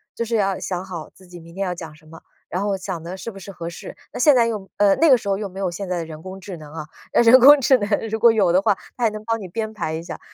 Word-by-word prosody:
就 235 - -2
是 230 +1 -2
要 195 -3 +1
想 180 -1 -4
好 175 -5 -8
自 185 - -19
己 175 0 -11
明 165 0 -14
天 195 +2 -3
要 180 -2 -2
讲 165 -3 -9
什 155 +1 -20
么， 165 +1 -14 0.3
然 185 +3 -2
后 205 -1 0
想 185 -3 -6
的 175 +2 -6
是 190 - -6
不 200 - -11
是 195 +1 -9
合 170 -3 -6
适。 170 - -10 0.2
那 - - -7
现 290 +2 +6
在 235 -2 +4
用 210 -4 -4
呃， 200 -1 +4
那 325 -2 +4
个 - - +9
时 220 -4 -4
候 195 - +1
又 205 0 -4
没 190 0 -10
有 190 -2 -1
现 180 +3 -6
在 180 - -2
的 165 - -4
人 160 0 -10
工 190 0 -8
智 185 -1 -8
能 150 -1 -12
啊， 155 -2 -6 0.3
人 235 +2 +7
工 285 +3 +8
智 260 +1 +5
能 205 -4 -3 0.2
如 220 - -2
果 230 +1 +6
有 205 -6 +2
的 180 - +4
话， 200 0 +2 0.2
它 245 - -4
也 225 - +3
能 215 0 -8
帮 225 0 -1
你 195 - -7
编 220 +4 -4
排 160 -6 -3
一 160 - -4
下。 170 - -8
195 Hz, 350 characters per minute, -21 LUFS, 175-220 Hz, 0.3 s, 个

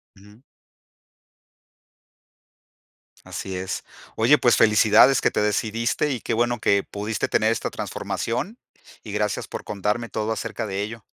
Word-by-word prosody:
Ujú. 105 +4 -18 2.8
Así 95 -1 -6
es. 95 0 -4 0.3
Oye, - - +5
pues - - +4
felicidades 110 +5 +5
que - - +2
te - - 0
decidiste 115 +6 0
y 125 - -3
qué 115 - -2
bueno 120 0 +1
que, 100 -1 +2
pudiste 105 +2 -3
tener 110 +1 +2
esta 115 - -2
transformación 180 - -4 0.5
y 105 - -8
gracias 105 -1 -1
por - - -7
contarme 105 +4 -2
todo 110 0 -2
acerca 110 - -4
de 95 +1 -3
ello. 110 +1 -6
110 Hz, 135 wpm, -23 LUFS, 105-115 Hz, 2.8 s, Oye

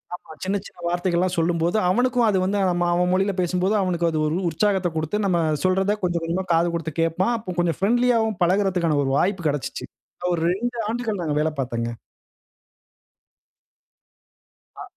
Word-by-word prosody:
ஆமா. 180 - -14
சின்ன, 195 +2 0
சின்ன - - -19
வார்த்தைகள்லாம் 175 +1 0
சொல்லும்போது, 170 +3 +1
அவனுக்கும் 245 +4 +2
அது 195 - +2
வந்து 200 +2 0 0.4
அவன் 180 +1 +1
மொழியில 195 +2 +1
பேசும்போது, 180 +3 0
அவனுக்கு 175 -2 0
அது 155 - -1
ஒரு 155 - -1
உற்சாகத்தக் 185 0 0
கொடுத்து 180 +7 -1
நம்ம 180 -3 +2 0.2
சொல்றதக் 190 +3 +1
கொஞ்சம் 175 -2 0
கொஞ்சமா 175 +3 -1
காது 165 +1 +3
கொடுத்து 165 -2 -4
கேப்பான். 175 +7 +1
அப்ப 185 -5 -6
கொஞ்சம் 170 -3 0
பிரெண்ட்லியாவும் 225 -1 +2
பழகுறதுக்கான 180 -4 +2
ஒரு 135 - -1
வாய்ப்பு 180 -2 0
கெடச்சுச்சு. 145 -2 -4 0.5
ஒரு 170 - -1
2 240 +5 -3
ஆண்டுகள் 230 -2 -2
நான் 175 - -3
அங்க 150 -1 0
வேல 160 - +1
பார்த்தேங்க. 115 -2 -3 2.9
அ - - -5
180 Hz, 150 wpm, -23 LUFS, 165-205 Hz, 2.9 s, காது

